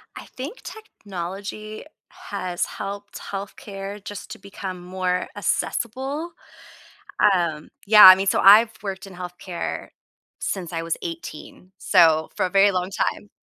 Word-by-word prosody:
I - - -9
think 280 - -8
technology 205 - -8 0.2
has 180 -1 -4
helped 200 +1 -7
health 200 0 -7
care 195 0 -8
just 205 0 -9
to - - -8
become 190 -2 -7
more 180 0 -2
assessable. 270 +8 -2 1.0
Um, 165 -4 -2 0.2
yeah, 210 0 +10
I 185 - +12
mean, 190 +1 -3
so 190 - +2
I've 215 +3 +8
worked 195 -1 -5
in 195 - -12
health 180 0 -8
care 175 -3 -5 0.5
since 180 -3 -4
I 165 -1 -2
was 165 0 -2
18, 165 +2 -8
so 160 -1 +4
for - - +1
a - - -5
very 195 +1 +5
long 180 0 -2
time. 200 +1 -2
195 Hz, 145 wpm, -23 LUFS, 180-205 Hz, 1.0 s, I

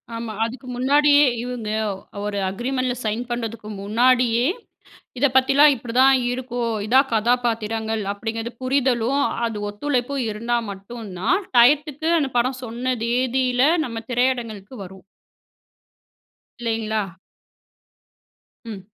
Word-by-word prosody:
ஆமா. 230 -1 -5
அதுக்கு 250 +2 -8
முன்னாடியே 285 +3 +4 0.2
இவங்க 245 -4 -5 0.6
ஒரு 205 -1 -3
அக்ரீமெண்ட்ல 255 +4 -2
சைன் 220 +3 -1
பண்ணுறதுக்கு 230 -2 -4
முன்னாடியே 240 +2 +3 0.7
இதப்பத்தில்லாம், 275 +2 +5
"இப்படிதான் 255 +3 +3 0.2
இருக்கும். 245 -2 -3
இதான் 265 +5 +3
கதாபாத்திரங்கள்." 225 -1 0
அப்படீங்கிறது 225 +2 -5
புரிதலும், 260 0 +1 0.2
அது 225 -2 -3
ஒத்துழைப்பும் 255 +4 -2
இருந்தா 235 +3 -1
மட்டும் 210 +3 -9
தான், 355 - +2 0.2
டயத்துக்கு 295 +5 +4
அந்த 280 -3 -1
படம் 255 +2 0
சொன்ன 245 +2 -2
தேதியில 250 +1 +1 0.2
நம்ம 230 -2 -5
திரையரங்குக்கு 240 -3 -1
வரும். 190 +1 -13 1.6
இல்லைங்களா? 225 -2 -1 1.6
ம். 205 -4 -7
240 Hz, 100 wpm, -22 LUFS, 225-260 Hz, 1.6 s, இதப்பத்தில்லாம்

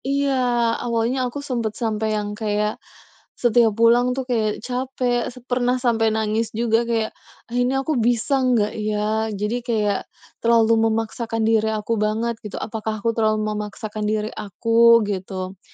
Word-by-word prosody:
Iya, 280 0 +1 0.5
awalnya 235 +2 0
aku 285 - -6
sempet 230 -4 -1
sampai 220 -2 -1
yang 205 -1 -3
kayak 210 0 -2 0.5
setiap 235 -2 +3
pulang 235 +1 +5
tuh 265 - -2
kayak 220 -3 0
capek, 250 -1 -1
se 255 - -12
pernah 250 0 +1
sampai 235 -3 +1
nangis 220 +1 0
juga 230 0 +2
kayak, 225 -2 0 0.4
"Ah, - - -4
ini 250 +2 +1
aku 270 +3 -1 0.2
bisa 245 +4 +1
nggak, 220 -4 +2 0.2
ya?", 215 +1 0
jadi 210 +3 -2
kayak 215 -4 0 0.4
terlalu 230 -1 +4 0.2
memaksakan 225 0 -2
diri 220 0 +3
aku 220 +1 -1
banget, 220 +2 0
gitu. 210 -4 -8
"Apakah 215 -1 -4
aku 230 - +2
terlalu 215 -1 +1
memaksakan 210 0 -4
diri 215 0 -1
aku?", 230 +3 +4
gitu. 190 -2 -4
225 Hz, 150 wpm, -22 LUFS, 215-240 Hz, 0.5 s, pulang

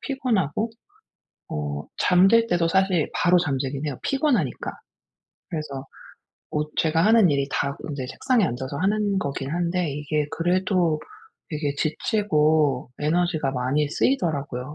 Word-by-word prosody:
피곤하고 225 - -1 0.8
어 75 -1 -3 0.2
잠들 195 +6 +5
때도 170 -1 +2
사실 190 -3 +2
바로 180 +1 +4
잠들기는 140 -2 -2
해요 140 -4 -4
피곤하니까. 260 - 0 0.8
그래서 140 -5 -5 0.7
어 150 - -1 0.2
제가 165 +1 +2
하는 220 -6 +5
일이 140 -1 +1
다 140 0 -1
인제 140 -4 -4
책상에 240 - +1
앉아서 130 0 -3
하는 200 +2 +1
거기는 140 -2 -3
한데 175 -1 0
이게 150 +1 -1
그래도 175 -2 +1 0.5
되게 150 -2 -2
지치고 155 - +1
에너지가 160 -1 +1
많이 135 +4 0
쓰이더라고요. 145 - -1
155 Hz, 295 characters per minute, -24 LUFS, 140-185 Hz, 0.8 s, 잠들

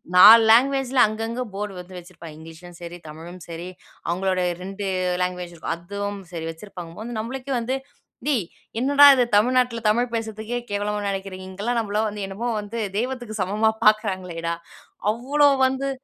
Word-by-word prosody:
4 220 +5 +10
லாங்குவேஜ்ல 265 +2 +3
அங்க 215 +1 -5
அங்க 235 +2 -4
போர்டு 205 0 -4
வந்து 180 +1 -10
வச்சிருப்பா, 175 -1 -11
இங்கிலீஷ்லயும் 165 +2 -12
சரி, 170 0 -7
தமிழும் 165 +4 -10
சரி, 170 +2 -6 0.4
அவுங்களோடய 185 0 0
2 195 +2 -6 0.4
லாங்குவேஜ் 180 -1 -2
இருக்கும். 165 0 -4
அதுவும் 200 +3 -5
சரி 165 -2 -5
வச்சிருப்பாங்கம்போது, 180 +4 -8
நம்பளுக்கே 255 +4 -5
வந்து, 245 +3 -2 0.5
"டேய் 250 -11 +1 0.4
என்னடா 285 +2 +6
இது 250 -2 +3
தமிழ்நாட்டுல 245 +2 +3
தமிழ் 240 +3 +2
பேசுறதுக்கே 220 +1 -3
கேவலமா 205 +1 -1
நெனைக்கிறீங்க. 190 -1 -5
இங்கலாம் 225 +6 -1
நம்பலாம் 215 0 0
வந்து 205 -1 -6
என்னமோ 200 +5 -4
வந்து 210 +3 -6 0.2
தெய்வத்துக்கு 240 -1 -3
சமமா 210 +4 +2
பாக்குறாங்களேடா" 185 -6 +1 0.6
அவ்ளோ 285 +6 +3 0.2
வந்து 265 +1 0
205 Hz, 140 wpm, -23 LUFS, 180-235 Hz, 0.6 s, 4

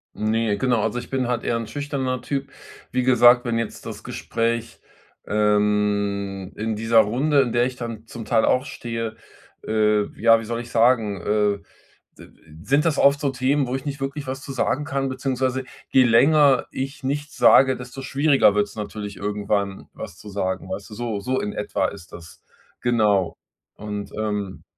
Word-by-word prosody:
Ne. 110 -1 0
Genau. 125 -4 +1
Also, 110 +2 -1
ich 120 - -8
bin 130 -2 -1
halt 120 -2 -1
eher 115 - 0
'n 115 - -3
schüchterner 135 0 -3
Typ. 140 -1 -3 0.4
Wie 125 - 0
gesagt, 125 -1 +6
wenn 120 -2 -1
jetzt 115 - -5
das - - -7
Gespräch, 115 0 -3 0.5
ähm, 105 -2 0
in 110 0 -2
dieser 115 +1 +3
Runde, 135 +7 +2
in 120 - -2
der 120 0 +3
ich 130 0 -5
dann 115 -2 -7
zum 115 0 -8
Teil 110 - +2
auch 130 - +2
stehe, 115 -4 -5 0.5
äh, 105 -1 +2 0.2
ja, 115 0 +6
wie - - -8
soll 115 +1 -3
ich 120 - -9
sagen, 115 -5 +2
äh, 105 0 0 0.6
di 80 +4 -16
sind 140 +4 +3
das 160 -4 +1
oft 140 +1 +4
so 140 - +1
Themen, 135 +2 +1
wo 125 - -3
ich 135 - -5
nicht 140 -1 -5
wirklich 140 +1 -4
was 130 0 -4
zu 135 - -7
sagen 130 +2 0
kann 140 -2 -2
beziehungsweise, 130 0 -1 0.3
je 130 - +5
länger 135 +3 +5
ich 135 +1 -5
nichts 145 +3 -3
sage 130 -1 +6
desto 125 +2 -8
schwieriger 135 -5 +3
wird's 105 0 0
natürlich 105 -1 -6
irgendwann 100 -1 -2
was - - -9
zu - - -13
sagen. 95 -1 -3
Weißt 100 - -6
du? 105 - -9
So 115 -3 -3
so 130 +4 -1
in 105 - -3
etwa 105 - -1
ist 95 -3 -10
das. 85 -1 -13 0.4
Genau. 105 -6 +2 0.4
Und 105 -1 -6
ähm, 105 -3 -3
115 Hz, 180 wpm, -23 LUFS, 105-130 Hz, 0.6 s, gesagt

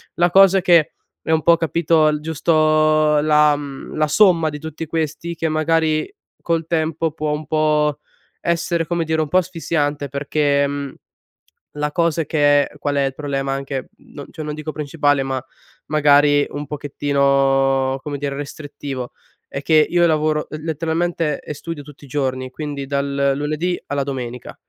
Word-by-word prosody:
La 175 0 +2
cosa 195 0 +6
che 170 -4 +4 0.3
è - - -10
un 160 0 +2
po' 170 0 +5
capito 165 -1 +2
il 150 -1 0
giusto 155 -1 +2
la 150 -1 +4
mhmm, 140 -2 -8
la 155 0 +2
somma 170 -2 +4
di 150 - -6
tutti 160 0 -7
questi, 160 +1 -3
che 165 - -1
magari 155 - +1 0.3
col 165 -1 -1
tempo, 160 -1 -1
può 155 -1 -3
un 150 0 -4
po' 150 -1 +1 0.4
essere, 170 0 0
come 170 -1 -1
dire, 160 0 0
un 155 - -2
po' 185 - +3
asfissiante, 155 -5 -1
perché, 140 0 +1
mhmm, 140 -1 -5 0.8
la 150 0 -1
cosa 170 0 +1
è - - -3
che 145 -2 +3
qual 145 0 -1
è 140 - +2
il 135 -1 -3
problema, 135 -2 -3
anche, 135 -1 -4
mhmm, 145 - -11
cioè 160 - -7
non 150 0 -4
dico 155 +1 -5
principale, 145 -2 0
ma 130 -1 -3 0.4
magari 145 -1 +4
un 145 0 -5
pochettino, 135 -2 +1
come 145 -1 -4
dire, 140 -1 -3
restrittivo, 140 -3 -6 0.3
è 140 - -5
che 155 -1 +4
io 175 0 +3
lavoro 155 -1 +1
l 155 - -4
letteralmente 165 -1 -1
e - - -6
studio 165 +1 -6
tutti 145 0 -14
i - - -15
giorni, 130 -1 -2
quindi 145 -2 -5
dal 140 0 0
lunedì 155 +5 -2
alla 140 -1 -1
domenica. 125 -3 -6
150 Hz, 165 wpm, -20 LUFS, 140-160 Hz, 0.8 s, cosa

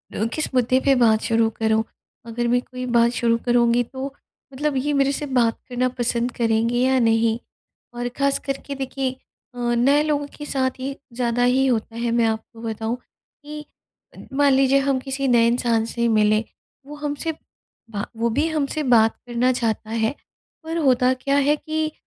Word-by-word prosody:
अ, 215 - 0
किस 310 -3 -2
मुद्दे 255 +1 +3
पे 275 -1 +5
बात 220 -3 +4
शुरू 225 0 +2
करूँ? 220 0 +2 0.4
अगर 235 +1 -2
मैं 245 +1 +2
कोई 255 0 -7
बात 235 -1 +3
शुरू 235 -1 +1
करूँगी 240 0 +3
तो 265 +2 -7 0.5
मतलब 290 0 -1
ये 290 +3 0
मेरे 275 -1 +2
से 290 +1 -3
बात 245 -5 +1
करना 250 +1 0
पसंद 240 0 0
करेंगे 230 +1 +1
या 260 +1 +3
नहीं? 225 0 +2 0.5
और 245 0 -3
ख़ास 280 0 +1
करके 275 +1 -4
देखिए 270 0 -3 0.4
अ, - - -12 0.2
नए 280 +5 +4
लोगों 290 -2 -1
के 295 - -7
साथ 260 -2 0
ये 270 +1 -4 0.2
ज़्यादा 240 0 0
ही 255 +2 +3
होता 230 -2 -1
है 235 0 -1
मैं 235 0 +2
आपको 225 +1 -4
बताऊँ 225 +1 -3
कि 300 +4 -13 0.7
मान 285 0 +4
लीजिए 270 +1 +4
हम 275 -1 +1
किसी 270 +1 -3
नए 235 -2 +4
इंसान 235 -1 +1
से 235 0 -1
मिले 215 -1 +3 0.4
वो 295 - -8
हमसे 295 +2 -3 0.6
बा 205 -1 -3
वो 230 +1 +1
भी 290 +8 +1
हमसे 305 -1 -1
बात 225 -4 +4
करना 240 +1 +1
चाहता 225 -3 -2
है 225 +3 0 0.5
पर 325 +1 -4
होता 255 -4 +3
क्या 275 +2 -1
है 285 +2 +3
कि 310 0 -3
250 Hz, 175 wpm, -22 LUFS, 230-275 Hz, 0.7 s, पे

